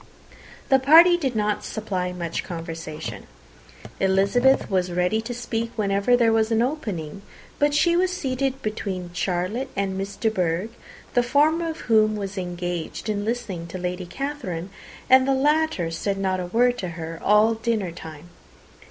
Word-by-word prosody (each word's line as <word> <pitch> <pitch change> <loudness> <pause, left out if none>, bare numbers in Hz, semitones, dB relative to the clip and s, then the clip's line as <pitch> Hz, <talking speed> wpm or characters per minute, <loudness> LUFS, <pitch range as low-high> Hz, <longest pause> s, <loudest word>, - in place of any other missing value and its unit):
The 270 -1 +5
party 325 +6 +7
did 270 -8 -2
not 210 -1 0
supply 190 -4 -3
much 170 -2 -4
conversation. 165 -2 -7 0.7
Elizabeth 200 +8 +3
was 185 -2 0
ready 180 +5 +1
to 225 +2 -6
speak 230 -1 -3
whenever 200 +3 +2
there 230 -2 +3
was 220 -1 +2
an 225 0 +2
opening, 200 - -4 0.4
but 290 0 +2
she 340 +3 +3
was 365 +1 +2
seated 270 -5 -2
between 190 -5 -4
Charlotte 185 +9 -2
and 195 -1 -1
Miss 195 +1 -4
de 220 +1 0
Bourgh 180 +1 -1 0.4
the 245 - +4
former 305 +7 +2
of 320 +1 -6
whom 215 -2 +3
was 200 -1 -5
engaged 175 +1 -4
in 205 -1 -1
listening 215 -7 -3
to 180 - -6
Lady 180 0 -4
Catherine, 195 - -5 0.4
and 260 0 +6
the 270 - +3
latter 295 - +1
said 195 +4 -2
not 190 -1 0
a 180 - -4
word 245 +5 +2
to 185 - -3
her 165 0 -6
all 210 +2 +5
the 225 - -10
dinnertime. 175 -8 -4
210 Hz, 160 wpm, -24 LUFS, 180-250 Hz, 0.7 s, party